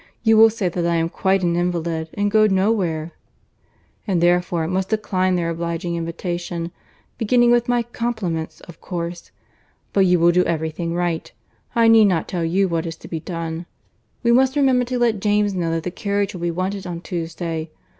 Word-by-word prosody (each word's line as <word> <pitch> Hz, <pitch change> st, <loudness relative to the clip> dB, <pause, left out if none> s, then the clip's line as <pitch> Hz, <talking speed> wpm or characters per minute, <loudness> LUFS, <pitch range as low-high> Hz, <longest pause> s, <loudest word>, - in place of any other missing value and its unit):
You 225 Hz, -1 st, +5 dB
will 225 Hz, +1 st, +8 dB
say 215 Hz, -4 st, -2 dB
that 175 Hz, 0 st, -1 dB
I 170 Hz, -, +1 dB
am 165 Hz, 0 st, +1 dB
quite 190 Hz, +1 st, +1 dB
an 170 Hz, -1 st, +1 dB
invalid, 170 Hz, -2 st, -1 dB
and 205 Hz, 0 st, 0 dB
go 215 Hz, 0 st, +5 dB
no 195 Hz, +1 st, +2 dB
where, 170 Hz, -6 st, -1 dB, 1.0 s
and 185 Hz, -4 st, +1 dB
therefore 175 Hz, -1 st, +2 dB
must 185 Hz, +2 st, -1 dB
decline 185 Hz, -4 st, 0 dB
their 170 Hz, -1 st, -1 dB
obliging 170 Hz, +1 st, -3 dB
invitation; 170 Hz, 0 st, -4 dB, 0.5 s
beginning 240 Hz, +1 st, +4 dB
with 240 Hz, 0 st, +2 dB
my 240 Hz, -1 st, +2 dB
compliments, 220 Hz, -9 st, -3 dB
of 170 Hz, -2 st, -14 dB
course. 170 Hz, -1 st, -5 dB, 0.6 s
But 195 Hz, -2 st, +4 dB
you 180 Hz, 0 st, +4 dB
will 170 Hz, +1 st, +5 dB
do 180 Hz, +1 st, +3 dB
every 160 Hz, -1 st, -1 dB
thing 170 Hz, +1 st, -4 dB
right. 175 Hz, -2 st, -2 dB, 0.4 s
I 230 Hz, -1 st, +5 dB
need 225 Hz, -1 st, +7 dB
not 180 Hz, -5 st, +1 dB
tell 175 Hz, -2 st, -2 dB
you 190 Hz, +4 st, +2 dB
what 165 Hz, -1 st, -2 dB
is 165 Hz, -, -5 dB
to -, -, -13 dB
be 165 Hz, -, -4 dB
done. 165 Hz, 0 st, -5 dB, 0.6 s
We 235 Hz, -, +3 dB
must 260 Hz, +3 st, +4 dB
remember 260 Hz, -3 st, +3 dB
to 250 Hz, +1 st, -2 dB
let 235 Hz, -4 st, +2 dB
James 205 Hz, -1 st, +2 dB
know 175 Hz, -3 st, -1 dB
that 165 Hz, 0 st, -1 dB
the 180 Hz, -, -3 dB
carriage 200 Hz, +1 st, -1 dB
will 180 Hz, -, -7 dB
be 175 Hz, -, 0 dB
wanted 185 Hz, +3 st, -3 dB
on 170 Hz, -1 st, -5 dB
Tuesday. 165 Hz, -2 st, -4 dB
180 Hz, 195 wpm, -21 LUFS, 170-205 Hz, 1.0 s, will